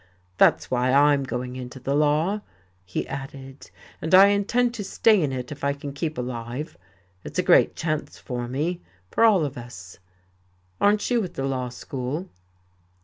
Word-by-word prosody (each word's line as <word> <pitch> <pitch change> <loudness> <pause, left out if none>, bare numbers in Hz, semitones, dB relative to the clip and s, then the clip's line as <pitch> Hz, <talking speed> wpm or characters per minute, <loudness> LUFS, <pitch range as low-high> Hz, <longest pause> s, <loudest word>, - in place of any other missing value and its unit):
"That's - - +4
why 125 0 +1
I 145 +2 +5
am 140 - +1
going 125 -1 -4
into 130 +1 -8
the 135 +2 -2
law," 150 +8 +2 0.4
he 90 0 -4
added. 135 0 -8 0.3
"And 160 +4 +3
I 195 +2 +9
intend 235 +4 +1
to 220 -4 -5
stay 210 +1 +3
in 145 -4 0
it 125 0 -5
if 145 -1 -9
I 140 0 +2
can 140 0 -7
keep 155 +2 -3
alive. 125 +3 -5 0.5
It's - - -8
a - - +2
great - - +5
chance 155 -2 -3
for 120 -2 -5
me 155 +8 -2 0.3
for - - +2
all 200 -8 +5
of 135 -3 -5
us. 90 -7 -11 0.8
Aren't 205 +3 +2
you 235 -3 +2
at 185 - -7
the 135 - -2
Law 130 -2 -2
School?" 130 +7 -5
140 Hz, 175 wpm, -24 LUFS, 125-175 Hz, 0.8 s, I